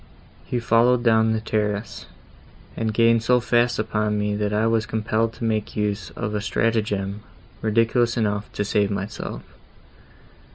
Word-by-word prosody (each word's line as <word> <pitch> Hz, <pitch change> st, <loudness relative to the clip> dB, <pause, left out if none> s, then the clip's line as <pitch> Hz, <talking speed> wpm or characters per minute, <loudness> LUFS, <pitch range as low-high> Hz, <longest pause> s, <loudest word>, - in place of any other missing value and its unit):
He 125 Hz, -, -2 dB
followed 120 Hz, +1 st, +3 dB
down 110 Hz, -1 st, +4 dB
the 110 Hz, -, 0 dB
terrace 105 Hz, -1 st, -3 dB, 0.7 s
and 110 Hz, -1 st, -1 dB
gained 115 Hz, +1 st, +3 dB
so 125 Hz, +2 st, +3 dB
fast 120 Hz, 0 st, +2 dB
upon 105 Hz, -1 st, -1 dB
me, 105 Hz, 0 st, -1 dB
that 105 Hz, 0 st, -1 dB
I 105 Hz, +1 st, +1 dB
was 115 Hz, -1 st, +1 dB
compelled 110 Hz, +1 st, 0 dB
to -, -, -9 dB
make 110 Hz, -2 st, -1 dB
use 105 Hz, -3 st, -1 dB
of 105 Hz, -, -3 dB
a 105 Hz, -, -1 dB
stratagem, 105 Hz, -3 st, -1 dB, 0.4 s
ridiculous 115 Hz, +2 st, +2 dB
enough, 105 Hz, -2 st, -1 dB
to 105 Hz, -, -2 dB
save 100 Hz, 0 st, +1 dB
myself. 100 Hz, 0 st, -5 dB
110 Hz, 150 wpm, -23 LUFS, 105-115 Hz, 0.7 s, down